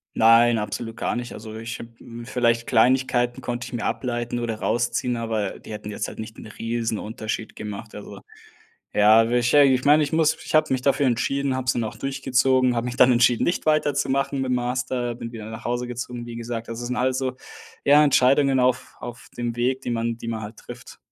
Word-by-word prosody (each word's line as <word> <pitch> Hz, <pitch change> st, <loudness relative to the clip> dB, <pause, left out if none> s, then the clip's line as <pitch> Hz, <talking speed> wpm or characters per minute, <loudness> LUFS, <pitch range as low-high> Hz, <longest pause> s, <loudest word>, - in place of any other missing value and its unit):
Nein, 115 Hz, +1 st, +5 dB
absolut 115 Hz, +1 st, -4 dB
gar -, -, -1 dB
nicht. 120 Hz, 0 st, -5 dB
Also, 110 Hz, 0 st, -9 dB
ich 115 Hz, +1 st, -6 dB
habe 115 Hz, -, -9 dB
hm, 120 Hz, 0 st, -10 dB
vielleicht 115 Hz, -1 st, +1 dB
Kleinigkeiten 125 Hz, 0 st, +2 dB
konnte 120 Hz, -1 st, -4 dB
ich -, -, -11 dB
mir 120 Hz, -, -3 dB
ableiten 120 Hz, -1 st, -2 dB
oder 115 Hz, -2 st, -3 dB
rausziehen, 120 Hz, +1 st, 0 dB
aber 110 Hz, -4 st, -3 dB
die -, -, -12 dB
hätten 105 Hz, 0 st, -6 dB
jetzt -, -, -3 dB
halt -, -, -10 dB
nicht 110 Hz, 0 st, -7 dB
'n -, -, -10 dB
riesen 115 Hz, 0 st, -3 dB
Unterschied 110 Hz, 0 st, -5 dB
gemacht, 105 Hz, -1 st, -7 dB
also, -, -, -9 dB, 0.7 s
ja, 110 Hz, +2 st, +5 dB
wahrscheinlich 125 Hz, +3 st, +4 dB
ich 130 Hz, -, -11 dB
meine, 150 Hz, +2 st, +6 dB
ich 145 Hz, -, -1 dB
muss 160 Hz, -1 st, +3 dB
ich -, -, -2 dB
habe 155 Hz, -3 st, +3 dB
mich 130 Hz, -, -1 dB
dafür 140 Hz, +2 st, +2 dB
entschieden, 135 Hz, +2 st, 0 dB
habe 130 Hz, -1 st, -3 dB
es 130 Hz, -, +2 dB
dann 120 Hz, -, -1 dB
auch 110 Hz, -, -5 dB
durchgezogen, 130 Hz, -2 st, +1 dB
habe 115 Hz, +1 st, -1 dB
mich 125 Hz, 0 st, -4 dB
dann 125 Hz, -1 st, +6 dB
entschieden, 120 Hz, 0 st, +3 dB
nicht 170 Hz, -, -1 dB
weiterzumachen 140 Hz, -2 st, +1 dB
mit 130 Hz, -, -2 dB
dem 125 Hz, -, +2 dB
Master, 125 Hz, 0 st, -2 dB
bin 115 Hz, 0 st, -7 dB
wieder 110 Hz, -3 st, -8 dB
nach 110 Hz, +1 st, -8 dB
Hause 120 Hz, +1 st, -1 dB
gezogen, 120 Hz, 0 st, -6 dB
wie 120 Hz, -1 st, -8 dB
gesagt. 115 Hz, -1 st, -5 dB
Also, 115 Hz, +1 st, -5 dB
das 120 Hz, -, -4 dB
sind 125 Hz, -, -2 dB
alles 130 Hz, +1 st, 0 dB
so 130 Hz, -1 st, -2 dB, 0.5 s
eher 145 Hz, +1 st, +6 dB
Entscheidungen 135 Hz, -1 st, +4 dB
auf 125 Hz, -1 st, 0 dB
auf 120 Hz, -1 st, -9 dB
dem 120 Hz, -1 st, -3 dB
Weg, 125 Hz, +2 st, 0 dB
die 125 Hz, -, -4 dB
man 115 Hz, 0 st, -1 dB
die 115 Hz, -, -8 dB
man 115 Hz, -1 st, -3 dB
halt 105 Hz, +1 st, -8 dB
trifft. -, -, -11 dB
120 Hz, 215 wpm, -23 LUFS, 115-130 Hz, 0.7 s, meine